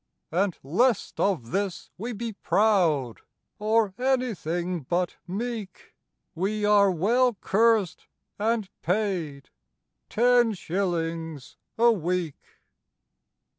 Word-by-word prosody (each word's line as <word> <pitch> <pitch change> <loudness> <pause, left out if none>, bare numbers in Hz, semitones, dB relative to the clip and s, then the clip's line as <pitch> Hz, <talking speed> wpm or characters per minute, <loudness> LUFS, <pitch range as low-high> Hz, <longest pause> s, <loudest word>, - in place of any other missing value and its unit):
"And 185 +2 0
lest 215 - +1
of 170 -13 0
this 195 0 -3
we 230 +6 -5
be 230 0 -5
proud 170 - +1 0.4
Or 215 -1 +2
anything 185 -10 -1
but 175 +6 -1
meek, 215 0 -5 0.4
We 205 +5 -1
are 205 -1 +5
well 230 +8 +2
cursed 215 -2 +1 0.3
and 220 -1 0
paid— 175 -7 -2 0.6
Ten 240 0 +4
shillings 165 -5 -3 0.2
a 235 +1 +6
week!" 180 -5 -2
195 Hz, 95 wpm, -26 LUFS, 170-225 Hz, 0.6 s, a